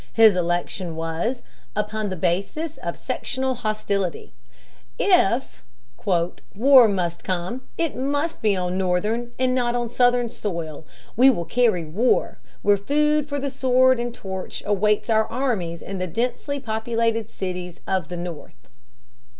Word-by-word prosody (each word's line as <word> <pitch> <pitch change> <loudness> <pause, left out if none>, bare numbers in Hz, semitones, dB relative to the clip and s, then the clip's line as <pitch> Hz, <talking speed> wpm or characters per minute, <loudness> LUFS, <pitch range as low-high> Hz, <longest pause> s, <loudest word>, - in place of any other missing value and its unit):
His 220 -3 +7
election 175 0 -1
was 165 +10 -2 0.3
"upon 210 0 -2
the 185 - -3
basis 200 - -1
of - - -5
sectional 265 0 -2
hostility." 215 -6 -2 0.6
If - - +2 0.9
"war 255 +2 +7
must 175 -4 -2
come, 185 +7 -2 0.2
it 330 -5 -1
must 285 +5 -1
be 210 -2 +3
on 180 0 -1
Northern 210 +6 0
and 255 0 +2
not 245 -1 +1
on 240 -1 -1
Southern 245 0 +3
soil.... 165 -6 -5 0.3
We 255 +4 +7
will 170 -10 0
carry 220 -8 +2
war... 210 +11 +1 0.2
where 205 0 +5
food 300 +6 +1
for 285 - -2
the 280 0 -2
sword 255 -1 +3
and 240 0 -2
torch 190 -4 -6
awaits 210 +2 +2
our 220 0 +3
armies 215 -11 -2
in 195 -1 -5
the 185 - -2
densely 250 - -2
populated 230 -2 -1
cities" 180 -2 -5
of 190 -4 -1
the 175 - -5
North. 170 -3 -8
215 Hz, 140 wpm, -23 LUFS, 180-250 Hz, 0.9 s, His